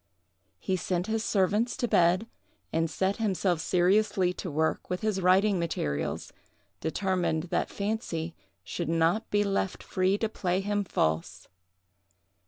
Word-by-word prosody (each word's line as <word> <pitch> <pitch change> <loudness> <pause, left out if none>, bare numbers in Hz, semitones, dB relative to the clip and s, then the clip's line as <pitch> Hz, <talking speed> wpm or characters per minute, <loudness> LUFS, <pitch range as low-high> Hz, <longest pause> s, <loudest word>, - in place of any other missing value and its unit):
He 190 - -1
sent 180 0 -1
his 220 +1 -1
servants 210 +5 +1
to 240 - 0
bed, 180 +2 +3 0.5
and 165 0 +1
set 190 +5 0
himself 185 -5 0
seriously 185 +1 +2
to 180 - -5
work 160 +1 -1
with 180 - -2
his 215 -3 0
writing 190 +2 +4
materials, 75 - -2 0.5
determined 175 -2 0
that - - 0
fancy 200 -6 -3 0.3
should 170 -2 -4
not 165 +6 +2
be 205 0 +2
left 195 -1 -1
free 185 +2 +1
to 225 - 0
play 185 -4 -1
him 205 +1 0
false. 80 - -1
185 Hz, 135 wpm, -28 LUFS, 170-205 Hz, 0.5 s, writing